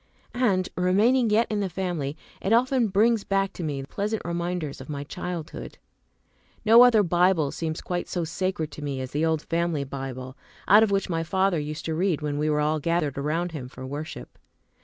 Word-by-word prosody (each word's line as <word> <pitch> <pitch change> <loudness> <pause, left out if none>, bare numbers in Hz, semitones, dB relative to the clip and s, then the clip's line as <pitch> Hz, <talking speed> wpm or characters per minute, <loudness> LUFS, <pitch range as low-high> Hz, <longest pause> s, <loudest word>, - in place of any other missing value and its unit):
And, 200 -7 +1
remaining 215 +7 +3
yet 220 +2 +4
in 210 - 0
the 195 -2 -1
family, 170 -6 -3 0.2
it 195 - -1
often 250 0 +3
brings 215 +2 +3
back 195 0 0
to 175 - -6
me 145 -3 -3
pleasant 205 +9 -3
reminders 170 -4 -3
of 130 - -11
my 140 -1 -4
childhood. 170 +1 -6 0.9
No 225 +2 +8
other 235 -4 +6
Bible 175 -4 +2
seems 160 -1 -4
quite 175 -1 -3
so 175 - -2
sacred 165 -1 -2
to 150 - -8
me 140 -2 -3
as 130 -1 -5
the 150 +2 -1
old 160 -1 0
Family 165 -3 -1
Bible, 130 -1 -6 0.3
out 210 +2 +8
of 220 - +4
which 195 -1 0
my 165 -2 -1
father 190 +1 +1
used 150 +1 -5
to 160 - -1
read 175 -1 +1
when 145 -1 -2
we 155 +1 +1
were 150 0 +1
all 155 +1 +1
gathered 165 -2 0
around 165 +5 -1
him 140 -6 -6
for 130 +1 -9
worship. 140 - -7
170 Hz, 195 wpm, -26 LUFS, 150-195 Hz, 0.9 s, No